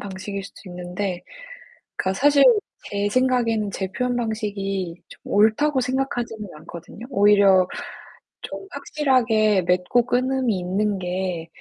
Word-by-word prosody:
방식일 195 Hz, 0 st, -6 dB
수도 195 Hz, -, -12 dB
있는데 180 Hz, +1 st, -4 dB, 0.8 s
그니까 190 Hz, 0 st, 0 dB
사실 285 Hz, 0 st, +5 dB, 0.5 s
제 205 Hz, 0 st, -1 dB
생각에는 235 Hz, -4 st, +1 dB
제 190 Hz, 0 st, -3 dB
표현 250 Hz, +2 st, -1 dB
방식이 195 Hz, -6 st, -3 dB
좀 -, -, -15 dB
옳다고 255 Hz, +7 st, +3 dB
생각하지는 245 Hz, -4 st, -2 dB
않거든요. 170 Hz, +7 st, -10 dB
오히려 200 Hz, -4 st, +5 dB, 0.7 s
좀 390 Hz, -, -7 dB
확실하게 235 Hz, -9 st, +2 dB
맺고 180 Hz, +7 st, +2 dB
끊음이 255 Hz, -4 st, +1 dB
있는 195 Hz, +3 st, -1 dB
게 180 Hz, -2 st, -3 dB
205 Hz, 275 characters per minute, -23 LUFS, 190-245 Hz, 0.8 s, 사실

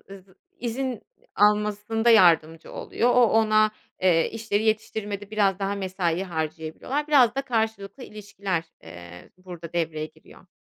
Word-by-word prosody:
ııı, 195 Hz, -2 st, -11 dB, 0.3 s
izin 245 Hz, 0 st, -3 dB, 0.3 s
almasında 210 Hz, +2 st, +2 dB
yardımcı 165 Hz, -6 st, +4 dB
oluyor, 240 Hz, -, -1 dB
o 245 Hz, -1 st, +6 dB
ona, 215 Hz, -1 st, +3 dB, 0.3 s
eee, 170 Hz, -3 st, +3 dB
işleri 220 Hz, -2 st, -1 dB
yetiştirmede 215 Hz, -2 st, -2 dB
biraz 200 Hz, -3 st, +1 dB
daha 200 Hz, 0 st, -2 dB
mesai 185 Hz, -2 st, -2 dB
harcayabiliyorlar. 160 Hz, -, -4 dB
Biraz 255 Hz, -5 st, +5 dB
da 275 Hz, -, -1 dB
karşılıklı 220 Hz, -2 st, -3 dB
ilişkiler, 200 Hz, -6 st, -4 dB, 0.2 s
eee, 85 Hz, +1 st, -12 dB
burada 175 Hz, -3 st, -10 dB
devreye 160 Hz, -2 st, -2 dB
giriyor. -, -, -19 dB
205 Hz, 125 wpm, -25 LUFS, 170-220 Hz, 0.3 s, o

